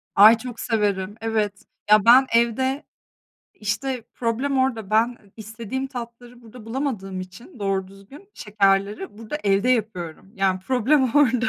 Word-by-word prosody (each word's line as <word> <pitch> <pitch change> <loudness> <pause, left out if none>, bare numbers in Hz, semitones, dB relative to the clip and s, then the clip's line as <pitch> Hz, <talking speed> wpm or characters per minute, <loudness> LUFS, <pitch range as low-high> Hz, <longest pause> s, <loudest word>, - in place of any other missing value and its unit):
Ay, 215 +3 +8
çok 245 -1 -8
severim, 205 -3 -1
evet. 215 -3 -2 0.3
Ya, 215 0 +6
ben 255 +3 +8
evde, 260 +4 +1 0.7
işte, 225 +3 -3
problem 255 +4 -1
orada. 230 -6 -1
Ben 230 +3 +2 0.2
istediğim 230 +4 -5
tatları 245 -1 -9
burada 225 0 -13
bulamadığım 225 -7 -3
için, 205 - -12
doğru 195 -2 -1
düzgün 200 - -15
şekerleri 200 0 0
burada, 225 +6 -5
evde 200 +4 +2
yapıyorum. 195 -7 -2
Yani, 190 -1 0
problem 260 +4 +2
orada. 250 -4 +3
225 Hz, 130 wpm, -23 LUFS, 200-250 Hz, 0.7 s, Ay